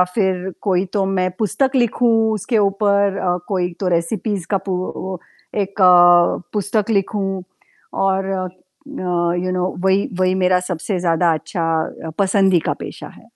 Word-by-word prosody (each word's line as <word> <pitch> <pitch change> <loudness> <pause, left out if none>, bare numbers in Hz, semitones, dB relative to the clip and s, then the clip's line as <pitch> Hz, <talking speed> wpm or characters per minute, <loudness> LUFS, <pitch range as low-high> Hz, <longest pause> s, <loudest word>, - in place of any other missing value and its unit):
फिर 190 -3 0
कोई 190 -2 +1
तो 200 -2 +1
मैं 185 0 +1
पुस्तक 265 +6 0
लिखूँ 240 -1 +2 0.2
उसके 220 +3 -1
ऊपर 200 -1 +2
अ, 180 -1 0
कोई 180 -3 -1
तो 190 - -1
रेसिपीज़ 200 +2 -2
का 200 - +2
पू 190 - 0 0.4
ओ - - -5 0.4
एक 195 0 -5 0.8
पुस्तक 210 +1 -1
लिखूँ 195 -2 -1 0.6
और 195 0 +1
अ, 185 -1 -2 1.0
यू 185 - -1
नो 185 0 -1
वही 190 +1 +2
वही 185 0 +2
मेरा 185 -1 +3
सबसे 180 +2 -2
ज़्यादा 170 -1 +2
अच्छा 160 0 -3
पसंदी 195 -2 +3
का - - +2
पेशा - - -8
है। - - -18
190 Hz, 145 wpm, -19 LUFS, 180-200 Hz, 1.0 s, मेरा